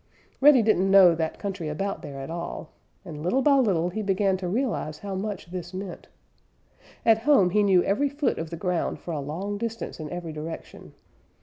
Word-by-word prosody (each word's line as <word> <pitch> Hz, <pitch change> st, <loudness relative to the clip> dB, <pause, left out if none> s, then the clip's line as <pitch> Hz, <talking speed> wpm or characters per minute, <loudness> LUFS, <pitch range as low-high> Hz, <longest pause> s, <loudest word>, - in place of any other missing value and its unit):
Reddy 270 Hz, -4 st, +7 dB
didn't 195 Hz, -3 st, +2 dB
know 190 Hz, -3 st, +7 dB
that 160 Hz, -1 st, -2 dB
country 195 Hz, -6 st, -4 dB
about 195 Hz, +6 st, -3 dB
there 140 Hz, -1 st, -8 dB
at 135 Hz, -, -7 dB
all, 170 Hz, -1 st, -6 dB, 0.3 s
and 155 Hz, -4 st, -8 dB
little 250 Hz, +11 st, +1 dB
by 280 Hz, 0 st, +5 dB
little 185 Hz, -9 st, +2 dB
he 215 Hz, +5 st, -4 dB
began 195 Hz, -1 st, +1 dB
to 185 Hz, -1 st, -4 dB
realize 205 Hz, -, -2 dB
how 200 Hz, +4 st, -6 dB
much 190 Hz, -3 st, -5 dB
this 180 Hz, 0 st, -6 dB
meant. 190 Hz, -1 st, -7 dB, 1.0 s
At 225 Hz, -1 st, +5 dB
home 230 Hz, -8 st, +4 dB
he 210 Hz, +2 st, +3 dB
knew 190 Hz, -3 st, +4 dB
every 280 Hz, +9 st, +1 dB
foot 285 Hz, 0 st, -1 dB
of 165 Hz, 0 st, -4 dB
the 170 Hz, -, -6 dB
ground 180 Hz, -1 st, -1 dB
for 175 Hz, -, -7 dB
a 155 Hz, -, -2 dB
long 185 Hz, +9 st, -4 dB
distance 230 Hz, -4 st, -5 dB
in 155 Hz, -1 st, -6 dB
every 175 Hz, -2 st, -6 dB
direction. 155 Hz, +2 st, -8 dB
190 Hz, 195 wpm, -26 LUFS, 165-210 Hz, 1.0 s, Reddy